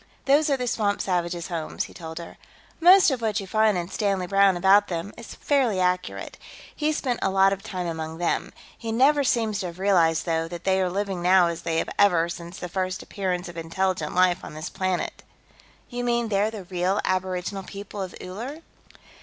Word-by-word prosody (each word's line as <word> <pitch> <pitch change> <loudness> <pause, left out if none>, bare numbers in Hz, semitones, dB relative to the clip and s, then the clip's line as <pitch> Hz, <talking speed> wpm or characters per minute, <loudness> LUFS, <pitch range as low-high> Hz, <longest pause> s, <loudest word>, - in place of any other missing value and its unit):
"Those 290 +3 +4
are 275 - +2
the 250 - -2
swamp 210 -4 0
savages' 175 -2 -2
homes," 165 -3 -3
he - - -10
told 160 -2 -8
her. 170 -1 -8 0.4
"Most 360 0 +7
of 255 -3 -2
what 220 -2 0
you 195 - -6
find 215 0 +2
in 170 -1 -3
Stanley 195 -2 -1
Browne 195 0 +4
about 195 +3 +5
them 175 +3 -4
is 235 - -10
fairly 255 -9 +1
accurate. 180 0 -1 0.4
He 305 0 0
spent 255 -5 -1
a - - +1
lot 195 0 +4
of 195 - -6
time 185 -4 -5
among 160 -1 -4
them. 175 0 -1 0.2
He 225 -1 -5
never 280 +5 +4
seems 225 -5 +1
to 185 - -3
have 170 0 -9
realized, 175 -5 +3
though, 165 -1 0
that 175 0 -8
they 190 0 +2
are 185 - +1
living 195 -1 -2
now 180 0 +5
as 170 0 -5
they 165 -1 -1
have - - -1
ever 175 -5 +4
since 170 +1 -7
the 180 - -5
first 185 +1 -3
appearance 185 -2 -3
of 175 -1 -10
intelligent 165 0 -2
life 180 0 +3
on - - -9
this 155 - -6
planet." 185 -1 -2 0.7
"You 245 -1 -4
mean, 235 -1 0
they're 205 +1 +2
the 215 -3 -7
real 185 +2 -1
aboriginal 185 +1 -1
people 200 +1 -8
of 185 -2 -5
Uller?" 245 - -7
190 Hz, 205 wpm, -25 LUFS, 175-215 Hz, 0.7 s, Most